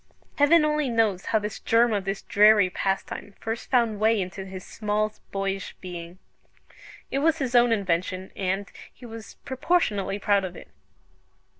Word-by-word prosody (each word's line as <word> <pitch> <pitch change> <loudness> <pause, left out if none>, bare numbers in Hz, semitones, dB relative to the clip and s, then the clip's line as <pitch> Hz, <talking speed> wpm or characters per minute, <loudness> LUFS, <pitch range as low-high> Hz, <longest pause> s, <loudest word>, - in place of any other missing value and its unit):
Heaven 305 +2 +6
only 300 -2 +1
knows 220 -5 +1
how 220 - +2
the 210 -1 -4
germ 230 0 +3
of 200 -2 -1
this 195 +1 -3
dreary 205 -2 +5
pastime 195 +1 -3
first 225 +1 -5
found 230 -5 +2
way 220 0 +3
into 190 +1 -4
his 190 -1 -8
small 215 0 -1 0.2
boyish 195 -1 -3
being. 175 -1 -8 0.9
It 275 - 0
was 320 +2 +2
his 260 -5 -2
own 240 -1 +5
invention, 185 -2 -1
and 195 +1 -2 0.2
he 250 - -14
was 225 -1 -10
proportionately 260 - 0
proud 200 -1 +2
of 180 -1 -5
it. - - -12
210 Hz, 155 wpm, -25 LUFS, 195-235 Hz, 0.9 s, Heaven